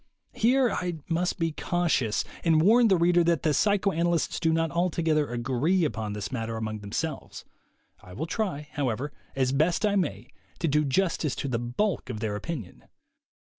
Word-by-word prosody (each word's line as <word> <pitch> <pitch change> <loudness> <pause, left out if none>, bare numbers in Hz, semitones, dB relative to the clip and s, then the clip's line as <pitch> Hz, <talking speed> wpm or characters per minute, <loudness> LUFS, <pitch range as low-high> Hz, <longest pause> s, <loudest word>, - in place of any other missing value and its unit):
Here 250 +2 +3
I 180 -1 -2
must 175 +2 0
be 165 -2 0
cautious, 160 -9 0 0.2
and 165 -2 +4
warn 225 +8 +5
the 190 -3 +4
reader 175 +1 +4
that 170 -3 +1
the 155 - +2
psycho 200 +3 +2
analysts 170 -1 0
do 165 - +2
not 165 0 +1
altogether 165 -3 +1
agree 135 +9 +1
upon 110 -7 -3
this 100 -2 -5
matter 115 -2 -3
among 110 -1 -4
themselves. 135 +9 -5 0.6
I 90 - -13
will 140 +12 -3
try, 165 -6 -3
however, 140 +1 -2 0.2
as 130 -1 +1
best 160 +8 +2
I 205 -1 +2
may, 135 - -2 0.3
to 170 - -1
do 150 0 +2
justice 155 0 0
to - - -3
the 120 -3 -1
bulk 130 - -1
of 110 -4 -4
their 105 -2 -2
opinion. 120 - -6
160 Hz, 170 wpm, -27 LUFS, 125-175 Hz, 0.6 s, warn